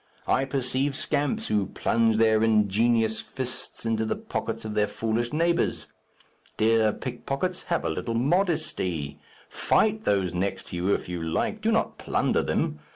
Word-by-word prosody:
I 135 - +2
perceive 135 +1 -1
scamps 145 -1 0
who 105 -3 +1
plunge 115 +1 +1
their 110 -1 +4
ingenious 110 +1 +3
fists 130 -2 -6
into 110 -1 +1
the 110 - -1
pockets - - -4
of 110 - -4
their 105 0 +2
foolish 115 +3 -1
neighbours. 170 +2 +1 0.7
Dear 110 0 +4
pickpockets, 135 - -3
have 170 - 0
a - - +1
little 115 - -3
modesty. 115 - 0 0.3
Fight 215 0 +1
those 95 - +1
next 95 +3 -2
to - - -5
you 90 +3 0
if - - 0
you 90 -1 -4
like; 80 0 -1
do - - +2
not - - 0
plunder - - +1
them. 75 - -1
115 Hz, 155 wpm, -26 LUFS, 105-135 Hz, 0.7 s, their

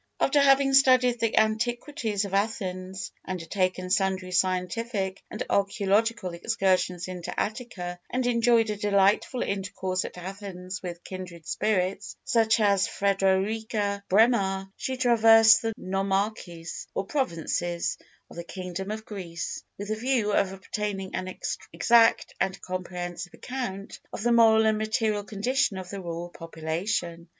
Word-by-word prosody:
After 285 +1 +3
having 275 0 +5
studied 255 -3 +5
the 230 -1 0
antiquities 220 0 0
of 195 - -7
Athens, 190 -3 -2
undertaken 185 0 -2
sundry 190 -1 +1
scientific 190 +2 -1
and - - -4
archæological 200 0 +1
excursions 185 -2 0
into 180 -2 -5
Attica, 200 -6 -4
and 255 0 -1
enjoyed 235 -2 +3
a - - -2
delightful 205 +4 +2
intercourse 185 -1 -2
at - - -8
Athens 190 0 -7
with 175 -2 -7
kindred 180 -3 -8
spirits 195 -1 -1
such 230 -3 +3
as 200 -3 +3
Frederika 200 +1 0
Bremer 195 -3 +3
she 260 0 -3
traversed 225 -2 +6
the 225 - -1
nomarchies, 195 -3 -2
or 195 - -1
provinces, 175 - -1 0.3
of - - -14
the 170 - -4
kingdom 185 +2 -6
of 220 +1 -5
Greece, 175 -5 -5 0.2
with 205 +1 -6
the 215 - 0
view 235 -2 0
of 195 -1 +2
obtaining 195 0 -4
an 185 0 -3 0.4
exact 230 -1 +4
and 190 0 -1
comprehensive 180 -1 -5
account 200 -7 -5
of - - -5
the 240 - +2
moral 220 -1 +6
and 215 -1 +2
material 215 -1 0
condition 215 +1 0
of 185 -1 -7
the 200 -1 -5
rural 170 0 -5
population. 170 +1 -3
200 Hz, 130 wpm, -27 LUFS, 185-225 Hz, 0.4 s, traversed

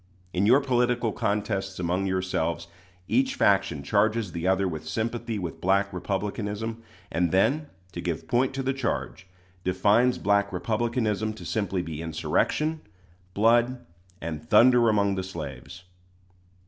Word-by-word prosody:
In 95 +3 +2
your 130 +5 +6
political 125 -3 +1
contests 100 -2 -2
among 90 +2 -1
yourselves, 90 -3 -1 0.4
each 265 +1 +1
faction 100 - +2
charges 105 +4 +1
the 85 +2 -3
other 95 +1 +2
with 80 -3 -5
sympathy 115 +2 -2
with 90 -4 -5
Black 100 +1 +2
Republicanism; 105 +4 -3 0.3
and 85 0 +1
then, 145 +11 +2 0.2
to - - -6
give - - -3
point 125 +2 +2
to 135 - -2
the 135 +1 0
charge, 130 -7 -3 0.4
defines 105 +7 +3
Black 100 0 +1
Republicanism 110 +1 -1
to 110 - -11
simply 100 -4 -1
be 80 -2 -6
insurrection, 150 - 0 0.5
blood, 120 +3 +3 0.3
and 80 -1 -6
thunder 120 -1 +6
among 100 -2 +2
the 95 -1 -2
slaves. 85 -1 -8
100 Hz, 135 wpm, -26 LUFS, 90-115 Hz, 0.5 s, your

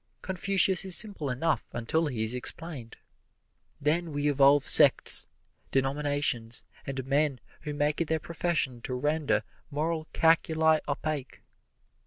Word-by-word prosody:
Confucius 190 0 +1
is 190 -2 +3
simple 200 -10 -3
enough 145 +6 -1
until 150 +8 -1
he 120 -6 -3
is 110 +2 0
explained. 125 0 -2 0.8
Then 160 +3 -1
we 145 0 -2
evolve 140 0 +3
sects, 145 -4 +7 0.4
denominations 135 -4 -2 0.2
and 135 -1 -5
men 140 -1 0 0.2
who 150 -2 -6
make 145 +2 -1
it 165 - -1
their 160 - 0
profession 155 -7 -3
to 125 +1 -5
render 145 -4 -1 0.3
moral 155 +2 -3
calculi 160 -1 +2
opaque. 145 -2 -5
145 Hz, 125 wpm, -27 LUFS, 135-160 Hz, 0.8 s, sects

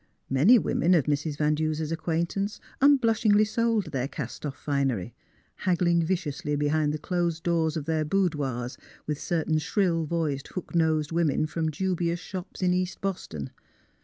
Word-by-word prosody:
Many 160 - +6
women 180 -4 +2
of 160 - +4
Mrs, 150 0 -1
Van 150 0 +2
Duser 155 0 -1
's 150 - -6
acquaintance 170 +5 -1 0.2
unblushingly 225 -6 +4
sold 220 -5 0
their 130 -1 -1
cast 140 -4 -6
otf 145 -3 -4
finery, 135 -7 -1 0.4
haggling 175 -2 +2
viciously 155 -4 -2
behind 150 +1 +1
the 155 - -2
closed 170 0 -1
doors 165 -2 +1
of 150 - -4
their 160 -1 0
boudoirs 150 -8 -1 0.3
with 150 -1 -3
certain 160 -2 0
shrill 170 -1 +1
voiced, 150 -4 -2
hook 185 - -7
nosed 160 -2 +2
women 165 -3 +1
from 160 +1 -2
dubious 175 +1 -1
shops 185 +1 -7
in 180 0 +3
East 180 0 -1
Boston. 80 - -4
160 Hz, 155 wpm, -27 LUFS, 150-180 Hz, 0.4 s, Many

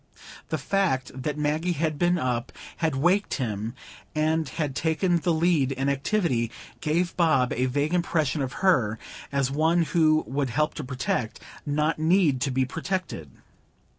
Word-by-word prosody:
The - - 0
fact 185 -10 0
that 135 +3 -4
Maggie 155 +4 0
had 155 -2 -1
been 175 0 +3
up, 125 -5 -2 0.3
had 160 -4 0
waked 180 +9 +2
him, 110 -2 -3 0.4
and 155 +1 +1
had 150 -5 -3
taken 160 +5 +1
the 170 +1 0
lead 160 -4 +2
in 135 +1 -1
activity, 140 - 0 0.3
gave 170 +3 0
Bob 155 -8 +3
a 130 +2 0
vague 145 +5 0
impression 160 -4 +1
of 130 -1 -2
her 120 - +3 0.3
as 140 -1 0
one 160 +4 +3
who 155 -2 +3
would 135 0 -1
help 150 +6 0
to 150 - -6
protect, 125 -3 -2 0.3
not 150 +2 0
need 160 -5 +3
to 140 - +1
be 130 0 +1
protected. 165 - -4
150 Hz, 155 wpm, -26 LUFS, 130-170 Hz, 0.4 s, been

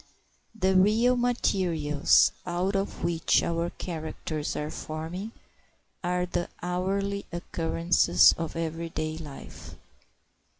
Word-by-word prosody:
The 190 -1 +3
real 220 +6 +4
materials 180 - +3
out 180 +3 -1
of 195 +1 -2
which 170 -1 +2
our 170 0 -1
characters 160 -3 -5
are 150 +1 -3
forming 165 +7 -5 0.7
are 180 0 0
the 175 -1 -3
hourly 195 +3 -1
occurrences 170 0 +3
of 165 0 -5
every 165 0 -3
day 155 0 -3
life. 145 -4 -10
175 Hz, 100 wpm, -27 LUFS, 160-190 Hz, 0.7 s, real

